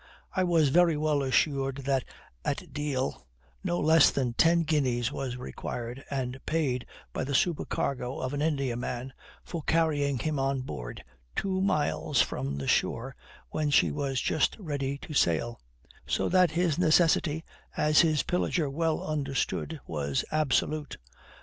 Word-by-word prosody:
I 185 - +2
was 165 -5 +3
very 170 +1 +4
well 150 -1 +1
assured 135 0 +1
that 135 -2 +1 0.4
at - - -3
Deal 135 - -2 0.4
no 175 -2 0
less 160 0 +6
than 125 -4 -1
ten 165 +6 +4
guineas 130 -6 +1
was 130 -3 -4
required, 125 +1 -6
and 130 -1 -3
paid 135 -6 0 0.3
by - - -2
the 140 +1 -2
supercargo 135 -5 0
of 130 - -3
an 145 - -2
Indiaman, 130 -4 -2 0.3
for 170 - -5
carrying 145 -4 +1
him 150 +2 -1
on 135 0 0
board - - -7 0.3
two 190 -1 0
miles 155 -6 +1
from 70 +1 0
the 70 -1 -4
shore 125 +3 0 0.4
when 155 -1 0
she 145 - +4
was 140 -3 -1
just 155 - +1
ready 140 -6 -3
to 155 - -7
sail; 115 - +1 0.5
so - - +1
that 185 -1 +5
his 170 0 0
necessity, 160 -2 +3 0.3
as 150 0 +5
his 155 -3 +2
pillager 170 -4 0
well 160 +2 0
understood, 150 +1 -2
was 70 -3 -2
absolute. 155 0 0
145 Hz, 145 wpm, -29 LUFS, 130-160 Hz, 0.5 s, less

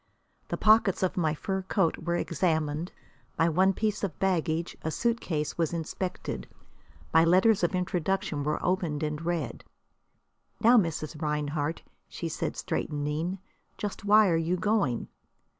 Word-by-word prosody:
The - - -3
pockets 215 -4 +4
of 185 - +1
my 160 -3 +1
fur 190 +5 -2
coat 190 -2 0
were 170 +1 -1
examined; 160 -1 0 0.5
my 165 - +3
one 185 +4 +4
piece 210 +1 -1
of 195 - -2
baggage, 170 -3 0
a 160 - -2
suitcase, 170 -8 -1
was 165 0 +1
inspected; 170 - -4 0.7
my 160 - +7
letters 185 +5 +4
of 175 - +2
introduction 180 -4 -1
were 150 +1 0
opened 175 -5 0
and 150 0 -2
read. 170 -1 -2 1.0
"Now, 235 +2 +6
Mrs. 165 -6 0
Rinehart," 150 0 -2 0.2
she - - -5
said, - - -3
straightening, 150 +5 -2 0.4
"just 205 -1 -5
why 210 +1 +6
are 165 - +3
you 175 +3 0
going?" 200 - 0
170 Hz, 140 wpm, -28 LUFS, 155-190 Hz, 1.0 s, my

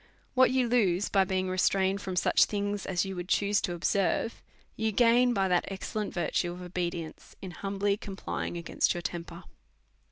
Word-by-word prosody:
What 260 0 +5
you 255 -1 +2
lose 205 -6 +2
by 195 -1 +3
being 185 0 -1
restrained 190 +1 +1
from 190 -2 -4
such 180 - +4
things 205 -1 -3
as 185 0 0
you 195 0 -5
would 175 0 -5
choose 205 +1 +2
to 175 - -2
observe, 195 +5 0 0.3
you 220 0 0
gain 240 +3 +4
by 195 -5 +1
that 180 -1 +2
ex 195 -1 -6
cellent 210 -2 -2
virtue 175 0 -1
of 180 +1 -8
obedience, 175 -2 -5
in 190 - -7
humbly 200 +2 -1
complying 195 -4 -5
against 170 +1 0
your 175 - -5
temper. 170 +1 -6
195 Hz, 180 wpm, -29 LUFS, 180-205 Hz, 0.3 s, What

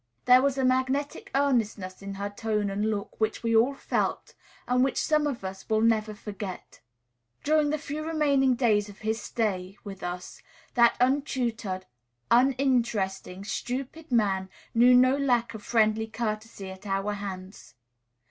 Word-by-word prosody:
There 250 +1 +7
was 275 0 +1
a 265 - +1
magnetic 260 +3 0
earnestness 225 -9 0
in 195 0 -6
her 200 +1 -3
tone 210 -1 -1
and 205 +2 0
look, 210 +1 -4
which 220 +1 0
we 230 -1 +1
all 245 +5 +4
felt, - - -2 0.3
and 250 +1 +3
which 270 - 0
some 305 -1 +2
of 260 -8 -4
us 190 +2 -7
will 220 0 +2
never 220 -2 +2
forget. 205 -3 -8 0.6
During 305 0 +3
the 305 - 0
few 300 0 -5
remaining 285 -5 +2
days 215 -4 +2
of 200 - -12
his 220 0 -1
stay 195 -4 -2
with 195 -2 -8
us, 180 0 -6 0.3
that 235 -1 +4
untutored, 245 -7 0 0.5
uninteresting, 235 -7 +1
stupid 265 +8 -5
man 195 -5 +1 0.2
knew 245 +2 +6
no 255 +2 +5
lack 245 -5 +1
of 220 - -8
friendly 220 0 +2
courtesy 215 -3 -4
at 190 +2 -11
our 195 +1 -1
hands. 190 - -8
225 Hz, 150 wpm, -27 LUFS, 200-260 Hz, 0.6 s, There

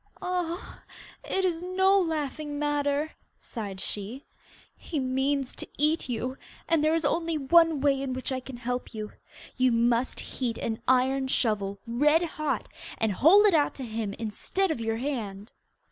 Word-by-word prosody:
'Ah, 360 -1 -3 0.4
it 380 0 0
is 340 -2 0
no 380 +2 +3
laughing 305 -3 -2
matter,' 290 +1 0 0.3
sighed 205 -5 -6
she. 210 +8 -5 0.5
'He 310 - -4
means 265 +1 0
to - - -5
eat 305 -1 +1
you, 250 +3 -3 0.3
and 330 -3 +3
there 310 +1 +3
is 330 -2 0
only 330 +1 +1
one 320 +1 +4
way 275 -1 +3
in 270 -1 -2
which 260 +2 -3
I 260 - -1
can 255 -1 -9
help 245 0 -4
you. 215 -1 -5 0.5
You 255 0 +4
must 235 +2 +2
heat 240 -3 -3
an 225 -1 -3
iron 260 +1 +3
shovel 205 -6 0
red 295 +8 +3
hot, 310 -2 -2 0.3
and 220 -1 +1
hold 345 - +6
it 410 - +5
out 300 -3 +3
to 270 - -6
him 220 -3 -3
instead 275 - -1
of 245 - -3
your 225 0 -1
hand. 225 -6 -4
270 Hz, 160 wpm, -28 LUFS, 235-315 Hz, 0.5 s, hold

